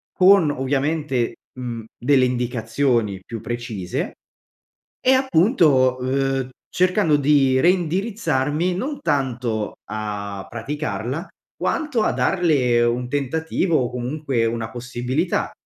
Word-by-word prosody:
con 185 -4 +6
ovviamente, 140 -1 -1 0.2
mhmm, 120 -2 -5
delle 130 +1 +3
indicazioni 120 -3 0
più 115 -2 -6
precise, 115 -7 -4 0.9
e 260 - +4
appunto, 165 - +3
uhm, 135 0 0 0.2
cercando 180 -3 +2
di 140 -2 +3
reindirizzarmi, 175 - +1
non 275 +9 -3
tanto 125 - -1
a 105 -2 -5
praticarla, 140 +3 -4 0.3
quanto 295 -8 0
a - - +2
darle 140 -10 +2
un 120 +1 0
tentativo, 160 +5 0
o 125 -3 -1
comunque 125 0 -2
una 115 -1 -3
possibilità, 125 +6 -2
135 Hz, 100 wpm, -22 LUFS, 120-160 Hz, 0.9 s, con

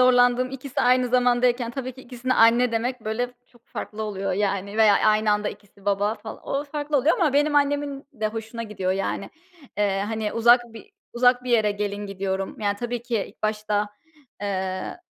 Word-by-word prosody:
zorlandığım 250 0 +4
ikisi 270 0 -4
aynı 250 0 +3
zamandayken 245 -1 +2
tabii 255 0 -5
ki 260 - -13
ikisine, 255 0 -2
"anne" 230 +1 +5
demek, 245 +2 -1
böyle, 245 +3 -2
çok 240 -1 -26
farklı 220 +1 -6
oluyor, 200 -2 -2
yani, 200 +1 -1
veya 215 -2 +6
aynı 215 0 +3
anda 210 0 0
ikisi, 200 -1 -13
"baba" 205 +1 +1
fal - - -9
o 280 +1 -2
farklı 295 0 -2
oluyor 280 +4 +3
ama 310 -6 +3
benim 295 +1 +2
annemin 285 -1 +1
de 220 -4 -2
hoşuna 225 +1 -6
gidiyor, 190 -4 -2
yani. 195 +1 -3 0.5
Eee, 200 -1 +1
hani, 220 -1 -2
uzak 240 +2 +6
bir 230 - -12 0.2
uzak 245 +1 +3
bir 250 - -3
yere 220 -3 +4
gelin 205 0 -3
gidiyorum. 195 0 -3
Yani, 205 -1 0
tabii 240 +1 -4
ki 235 -4 -1
ilk - - -21
başta, 210 -1 0 0.5
eee, 190 -2 -3
230 Hz, 180 wpm, -24 LUFS, 205-250 Hz, 0.5 s, veya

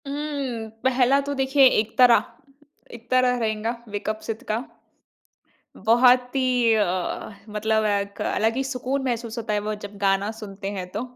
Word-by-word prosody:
हुँ, 280 -5 -4 0.2
पहला 260 +1 +3
तो 285 +1 -4
देखिए 270 +1 +4
इकतारा 235 +3 +5 0.8
इकतारा 250 +2 +1
रहेंगा, 220 -1 -1 0.2
वेक 205 +1 -4
अप 215 0 -2
सिड 225 -1 -4
का। 215 - +1 1.2
बहुत 250 +4 +4
ही 270 - +2 0.3
एक 200 0 -1
मतलब 220 +1 0
एक 200 -1 -1
अलग 225 +1 0
ही 270 - 0
सुकून 265 +1 -3
महसूस 235 -2 -3
होता 225 -2 -3
है 210 - +1
वो 215 - -1
जब 205 0 -10
गाना 195 +1 +1
सुनते 195 -1 -6
हैं 180 -1 -5
तो। 210 - -1
225 Hz, 150 wpm, -24 LUFS, 210-255 Hz, 1.2 s, इकतारा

